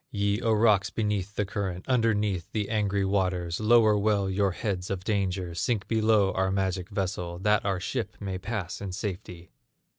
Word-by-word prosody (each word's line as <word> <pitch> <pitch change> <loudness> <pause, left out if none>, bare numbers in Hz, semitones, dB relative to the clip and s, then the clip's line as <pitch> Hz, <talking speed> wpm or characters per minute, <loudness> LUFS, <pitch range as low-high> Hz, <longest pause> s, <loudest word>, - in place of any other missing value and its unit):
Ye, 100 +1 0
O 115 -2 +1
rocks 105 -2 +4
beneath 105 -2 -2
the 105 - 0
current, 95 -2 -4
Underneath 105 -7 +1
the 105 -2 -1
angry 100 -2 +1
waters, 90 -3 0
Lower 110 -1 +5
well 100 -2 +1
your 100 +1 +2
heads 90 -1 -3
of 95 -2 -3
danger, 95 -4 -1
Sink 105 +4 -1
below 110 -3 +3
our 95 0 0
magic 95 -1 -1
vessel, 95 -4 -3
That 105 +3 +2
our 95 -2 0
ship 115 +6 -3
may 95 -2 -4
pass 100 -4 -4
in 95 -2 -5
safety! 90 -3 -6
100 Hz, 170 wpm, -27 LUFS, 95-105 Hz, -, Lower